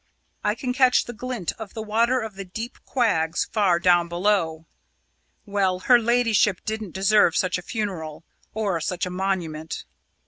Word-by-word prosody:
I 210 - +1
can 250 +1 -3
catch 255 -1 +4
the 240 - -7
glint 240 -5 -4
of 220 -3 -8
the 220 - -4
water 230 +4 +2
of 220 -2 -6
the 195 0 -7
deep 220 +6 -7
quags 175 -10 +1
far 200 -5 +2
down 175 -1 +4
below. 170 -3 0 0.8
Well, 195 -3 0
her 245 +4 +6
ladyship 230 -4 +2
didn't 215 -4 -4
deserve 195 -2 +4
such 185 -1 +1
a - - -8
funeral 175 -7 -4 0.3
or 200 -6 -1
such 180 +3 -2
a 180 - -5
monument." 175 -4 -3
200 Hz, 160 wpm, -24 LUFS, 175-225 Hz, 0.8 s, her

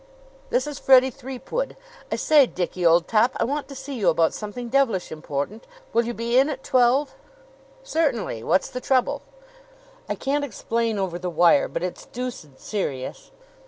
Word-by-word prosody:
"This - - +1
is 295 -2 -6
Freddie 260 0 +6
Threepwood. 270 - -5 0.3
I - - +1
say, 295 -4 +5
Dickie, 180 -2 -3
old 170 0 +5
top, 230 +3 +2
I - - +1
want 285 +4 -2
to 275 - -10
see 270 +1 -7
you 210 -9 +2
about 165 0 +2
something 220 +3 -6
devilish 235 -7 +1
important. 155 - -5 0.3
Will 235 0 +3
you 240 - -3
be 235 +2 +2
in 275 +3 +3
at 265 -3 -5
twelve?" 255 +3 +3 0.7
"Certainly. 300 - -1
What's 175 +10 +1
the 250 - -5
trouble?" 255 -1 +1 0.9
"I - - 0
can't 285 +2 -1
explain 230 -3 -2
over 185 -3 -2
the 180 0 -3
wire; 175 +3 +4
but - - -4
it's 180 - -5
deuced 240 - -7
serious." 140 -11 -4
235 Hz, 165 wpm, -24 LUFS, 180-270 Hz, 0.9 s, Freddie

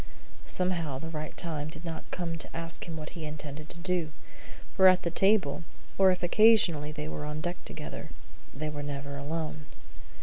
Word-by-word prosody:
Somehow 170 -7 0
the 160 +4 -5
right 155 -1 -5
time 155 -3 -2
did 160 +2 -5
not 165 -1 -5
come 170 -2 -2
to - - -5
ask 165 0 -4
him 165 -1 -5
what 155 -1 -6
he 170 -3 -7
intended 150 0 -6
to 170 - -4
do; 175 -3 0 0.6
for 190 -2 +8
at 185 0 +6
the 170 - 0
table, 190 -5 +3 0.3
or 195 -1 +6
if 180 -1 +1
occasionally 175 -6 +5
they 150 0 -5
were 150 - -4
on 150 +1 -3
deck 175 +2 -3
together, - - -6 0.4
they 155 +3 -4
were 150 -1 -4
never 140 -1 -4
alone. 150 +1 -4
160 Hz, 180 wpm, -30 LUFS, 150-175 Hz, 0.6 s, for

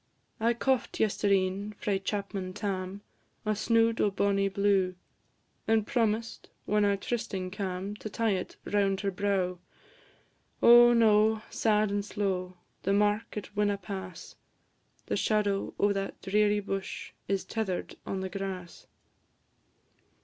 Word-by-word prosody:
I 230 +2 +2
coft 260 +1 0
yestreen, 200 -1 +1
frae 200 -2 0
chapman 195 -1 -3
Tam, 195 -1 -3 0.4
A 215 0 +1
snood 230 +1 +2
o' 210 - +4
bonnie 195 0 +1
blue, 195 -2 +2 0.7
And 220 -1 +3
promised, 225 -3 -1 0.2
when 210 0 +2
our 200 -1 +3
trysting 195 -4 -3
cam', 190 +1 -4
To 215 - -6
tie 225 +1 0
it 185 -2 -3
round 200 -2 +1
her 200 -1 -1
brow. 185 -2 -1 1.0
Oh, 240 0 +8
no! 220 -1 +4
sad 215 -2 +2
and 205 0 0
slow, 185 -3 -2 0.2
The 195 - +1
mark 210 +2 +1
it 210 0 -7
winna 205 -1 +1
pass; 185 -2 -7 0.7
The - - -1
shadow 205 -2 0
o' 205 0 +3
that 195 0 -4
dreary 210 +1 +2
bush 195 -1 -5 0.2
Is 195 -1 -1
tether'd 210 -5 -3
on 190 - -3
the 190 - -3
grass. 185 -2 -6
200 Hz, 130 wpm, -29 LUFS, 195-215 Hz, 1.0 s, Oh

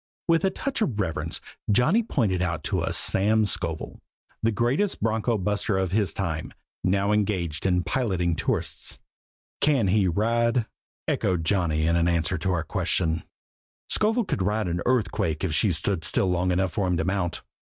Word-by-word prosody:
With 165 +1 +3
a 190 - +4
touch 270 +6 -3
of 120 - 0
reverence 85 -5 -2 0.3
Johnny 155 - +4
pointed 110 - 0
out 85 -4 -1
to - - -1
us - - 0
Sam 110 +3 +3
Scovel, 85 -5 -3 0.4
the 115 - +2
greatest 125 - 0
bronco 115 +1 +1
buster 105 +1 0
of 95 -2 0
his 100 -3 +1
time, 80 -5 -4 0.3
now 100 +2 +2
engaged 95 -6 0
in 90 -1 +2
piloting 90 -10 0
tourists. - - -2 0.6
"Can 135 -10 +3
he 100 0 +3
ride?" 115 +5 +1 0.4
echoed 90 -4 0
Johnny 80 -4 +1
in 85 +1 +2
answer 85 +1 +1
to 95 +3 0
our 85 -2 0
question. 80 +1 0 0.7
"Scovel 220 +2 +2
could 105 - -2
ride 105 +2 0
an 85 0 -2
earthquake 90 - 0
if 90 -5 0
she 90 +6 +3
stood 85 +2 -1
still 90 +4 +1
long 90 +1 +1
enough 95 +1 +1
for 100 -4 -1
him 90 -1 +1
to 80 - -1
mount! 95 -2 -1
95 Hz, 165 wpm, -25 LUFS, 85-110 Hz, 0.7 s, a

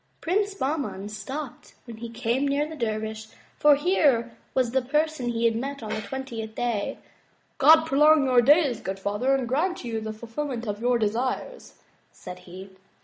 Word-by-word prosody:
Prince 400 +3 0
Bahman 270 - -3
stopped 245 +6 -7
when 230 -3 -9
he 235 +1 -7
came 240 +4 -1
near 285 +2 0
the 320 - -8
dervish 220 -3 -3 0.3
for 295 -1 +6
here 280 -7 +2 0.2
was 255 -3 +2
the 265 +1 +2
first 250 +2 -16
person 300 -4 +1
he 235 0 -1
had 230 -1 +3
met 275 +2 -4
on 215 - -5
the - - -3
twentieth 225 -2 -6
day. 235 -4 -2 0.6
'*God 315 +3 +7
prolong 300 0 +5
your 250 -2 +5
days, 280 -2 +4
good 190 0 -4
father, 210 +8 0
and 260 -3 -2
grant 315 +5 -1
you 225 -2 -3
the 220 0 -4
ful 220 +2 -10
filment 245 0 -4
of 205 +1 -4
your 245 0 +2
desires," 245 - -3 0.4
said 180 0 -10
he. 190 +2 -10
245 Hz, 180 wpm, -25 LUFS, 225-290 Hz, 0.6 s, God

